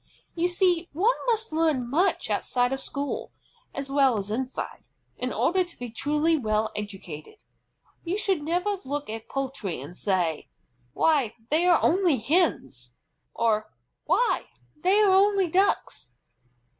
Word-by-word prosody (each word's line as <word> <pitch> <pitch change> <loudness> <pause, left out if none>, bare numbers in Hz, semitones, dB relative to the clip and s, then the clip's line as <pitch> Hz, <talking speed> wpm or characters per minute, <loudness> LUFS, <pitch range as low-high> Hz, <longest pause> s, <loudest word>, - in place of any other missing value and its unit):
You 345 +1 +1
see, 355 -1 +1
one 405 +11 +3
must 450 -6 0
learn 310 -6 +1
much 340 +10 +1
outside 245 +1 0
of 270 - -4
school, 280 -1 -4 0.4
as 275 0 -6
well 270 -4 +4
as 200 0 -4
inside, 255 +3 -4 0.3
in - - -3
order 370 +1 +2
to 350 -1 -14
be 245 -2 -6
truly 300 +7 +1
well 215 -5 0
educated. 205 - -8 0.6
You 360 +3 -2
should 385 -6 0
never 355 +6 0
look 285 -3 -4
at 225 0 -7
poultry 265 - -3
and 145 +7 -9
say, 180 -6 -1 0.4
"Why, 275 -9 +2 0.2
they 330 +4 +3
are 345 -2 +5
only 350 -4 +3
Hens!" 220 - 0 0.4
or 215 -2 +1 0.3
"Why, - - +1 0.3
they 365 +6 +2
are 405 -2 +5
only 395 -1 +4
Ducks!" 380 - 0
290 Hz, 140 wpm, -26 LUFS, 225-360 Hz, 0.6 s, are